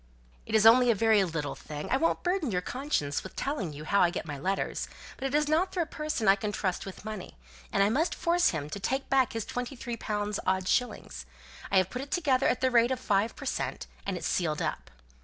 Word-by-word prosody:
"It 220 - -1
is 220 0 +5
only 245 +2 +8
a 230 - +5
very 220 -1 +4
little 160 -5 -3
thing. 150 -1 -7
I 265 - +4
won't 330 +4 +1
burden 355 -5 0
your 180 -4 0
conscience 250 - -1
with 190 - -10
telling 250 - -2
you 150 +1 -8
how 200 +5 +3
I 175 - +5
got 175 - -4
my 145 -3 -6
letters, 190 +6 -1 0.3
but 270 - -3
it 270 - -2
is 300 0 +3
not 335 +5 +2
through 355 - 0
a - - -7
person 305 -8 -3
I 195 - +7
can 205 +1 -3
trust 190 -2 -2
with 195 +1 -9
money; 215 - -7 0.3
and - - +3
I 200 - +3
must 315 +9 +1
force 350 +1 +3
him 150 -3 -3
to 200 - -4
take 265 +7 -2
back 265 -2 +3
his 225 -2 -3
twenty 250 +2 -4
three 240 -1 -5
pounds 210 -1 -2
odd 190 0 0
shillings. 125 - -1 0.4
I 195 - +4
have 185 0 +3
put 250 - -4
it 275 - -7
together 280 -7 +2
at 245 - +1
the 260 0 +2
rate 235 0 +5
of 260 -1 -1
five 210 -2 +1
per - - -9
cent., - - -2 0.2
and 195 -2 -2
it's 165 - -6
sealed 155 -4 0
up. - - -3
220 Hz, 245 wpm, -29 LUFS, 185-265 Hz, 0.4 s, only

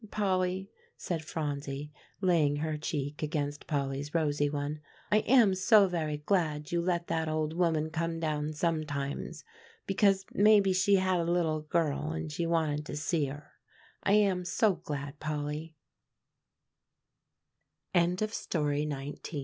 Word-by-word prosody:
"Polly," 190 -1 0 0.3
said 165 -3 -3
Phronsie, 145 -2 -4 0.3
laying 165 -6 +3
her 155 +1 -2
cheek 150 -1 -3
against 145 -2 -3
Polly's 140 +1 -2
rosy 145 -2 +1
one, 145 +1 -3 0.3
"I 210 - +5
am 230 -4 +5
so 195 +2 +5
very 155 -4 -2
glad 150 -2 0
you 170 0 +1
let 170 -1 0
that 160 -1 -1
old 155 0 -1
woman 160 -2 +1
come 165 +1 -2
down 155 -1 -1
sometimes, 150 -3 -2 0.4
because 195 -1 +2
maybe 205 -2 +5
she 195 +2 +4
had 185 -1 +2
a 170 0 0
little 160 -3 +1
girl 150 - -1
and 80 -1 -4
she 170 - -2
wanted 155 -3 0
to 150 - -5
see 155 +1 0
her. 145 +2 -9
160 Hz, 110 wpm, -30 LUFS, 150-180 Hz, 0.4 s, I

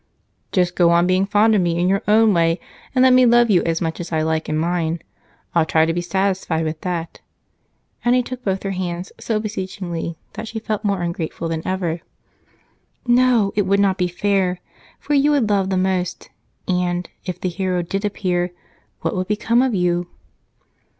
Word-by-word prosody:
"Just 180 -2 +1
go 175 -2 +4
on 170 +1 +4
being 185 +2 +2
fond 210 +2 +4
of 205 - +3
me 170 -1 0
in 175 +1 +1
your 195 +1 +2
own 215 0 +5
way, 165 0 +2 0.4
and 255 - +5
let 260 -1 +6
me 255 0 +6
love 240 -1 +5
you 180 - +5
as 165 0 0
much 165 -1 -2
as 170 -1 -6
I 160 -1 +1
like 160 0 -1
in 155 - 0
mine. 165 0 0 0.5
I'll 170 - +4
try 160 0 +3
to 165 - 0
be 175 - -1
satisfied 185 -2 -1
with 155 0 -4
that." 170 -2 -4 0.8
And 245 +1 +3
he 250 - +2
took 255 +1 -7
both 195 -1 -1
her 195 - -2
hands 180 -1 -4
so 220 -2 -1
beseechingly 185 -5 -4 0.2
that 225 - -6
she 225 - -6
felt 215 -1 -3
more 200 -4 0
ungrateful 170 -1 -3
than 160 -1 -2
ever. 175 -3 -2 1.0
"No, 240 -4 +3
it 205 -2 +1
would 200 +1 +3
not 195 -2 +2
be 180 - +2
fair, 185 0 0 0.4
for 295 - -3
you 285 +1 +4
would 270 -8 +2
love 195 -2 +1
the 190 - 0
most 185 -1 -1 0.4
and, 180 -1 0 0.2
if 180 -1 -4
the 185 - -1
hero 180 0 -1
did 195 +4 -3
appear, 180 -3 -1 0.5
what - - -1
would 185 0 -2
become 225 +3 +2
of 255 -4 +1
you?" 175 -1 0
185 Hz, 195 wpm, -20 LUFS, 175-210 Hz, 1.0 s, let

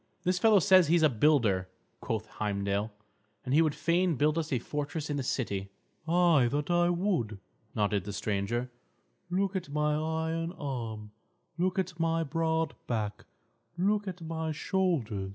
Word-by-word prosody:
"This 180 0 +1
fellow 220 +1 +6
says 185 -2 +6
he 165 - +4
is 170 - +3
a 155 - +6
builder," 110 -8 +2 0.3
quoth 110 -1 -3
Heimdal. 100 0 -2 0.6
"And 130 - -1
he 155 - +6
would 155 -3 +1
fain 170 +2 +1
build 150 +3 +2
us 165 -1 -2
a 130 - +2
fortress 145 +4 -4
in 145 - -1
the - - -1
city." 100 -7 -2 0.4
"Ay, 170 -6 +4
that 145 +6 -1
I 175 0 +3
would," 175 - 0 0.4
nodded 105 -2 0
the 105 - -4
stranger, 105 +5 -2 0.6
"Look 195 +2 0
at 180 -4 -3
my 150 +1 +1
iron 160 +2 -2
arm; 115 - -5 0.5
look 185 +2 +1
at 185 -2 -2
my 165 0 +1
broad 160 +1 0
back; 110 -3 -3 0.5
look 205 +3 +1
at 180 -2 -6
my 160 0 -3
shoulders. 150 - -1
155 Hz, 160 wpm, -30 LUFS, 115-175 Hz, 0.6 s, fellow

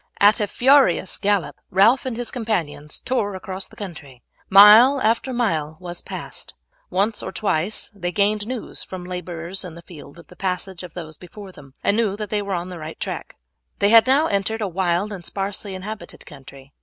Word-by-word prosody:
At 205 +3 +6
a 210 - 0
furious 255 -7 +3
gallop 200 -2 0
Ralph 225 +8 +4
and 235 -3 -4
his 245 -1 -1
companions 170 - -3
tore 210 -6 -1
across 190 0 -5
the - - -18
country. 150 - -10 0.3
Mile 215 +8 +8
after 230 +3 +1
mile 160 -11 -1
was 175 -1 -7
passed. - - -8 0.3
Once 210 +3 0
or - - -5
twice 200 +1 -2
they 180 -3 -4
gained 205 +2 +1
news 250 -2 -4
from 185 -1 -8
labourers 180 0 -5
in 175 -3 -9
the 170 - -12
field 155 -3 -13
of 170 - -14
the - - -17
passage 185 -1 -3
of 180 -3 -11
those 160 -3 -8
before 195 +2 -11
them, 140 -5 -16
and 200 - +3
knew 215 -4 +1
that 210 -1 -6
they 210 -1 0
were 200 -2 -3
on 175 +1 -4
the 180 -2 -8
right 155 +1 -8
track. - - -5 0.4
They 200 - +3
had 225 +2 +7
now 280 +4 +4
entered 220 -1 -1
a 205 - 0
wild 185 +2 -1
and 185 -3 -8
sparsely 195 +1 -4
inhabited 205 +3 -8
country. 135 -1 -14
195 Hz, 195 wpm, -22 LUFS, 175-215 Hz, 0.4 s, Mile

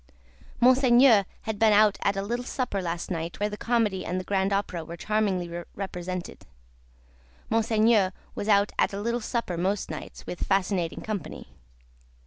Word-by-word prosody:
Monseigneur 250 -4 +6 0.2
had 220 -2 -4
been 220 -1 +5
out 210 0 +4
at 200 - +1
a 195 - -1
little 240 +4 -2
supper 250 -6 -2
last 170 0 -4
night, 165 0 -4
where 210 +1 0
the - - -4
Comedy 215 -4 0
and 180 +1 -2
the - - -5
Grand 195 0 0
Opera 195 -4 -1
were 170 +2 -8
charmingly 185 -5 -1
represented. 185 -2 -6 1.0
Monseigneur 220 -3 +3 0.2
was 205 - -5
out 200 -1 +4
at - - +2
a 200 - -3
little 235 +3 -1
supper 220 -6 -2
most 190 +3 -1
nights, - - -8
with 175 - -6
fascinating 190 -3 0
company. 215 -3 -6
200 Hz, 155 wpm, -26 LUFS, 185-220 Hz, 1.0 s, Monseigneur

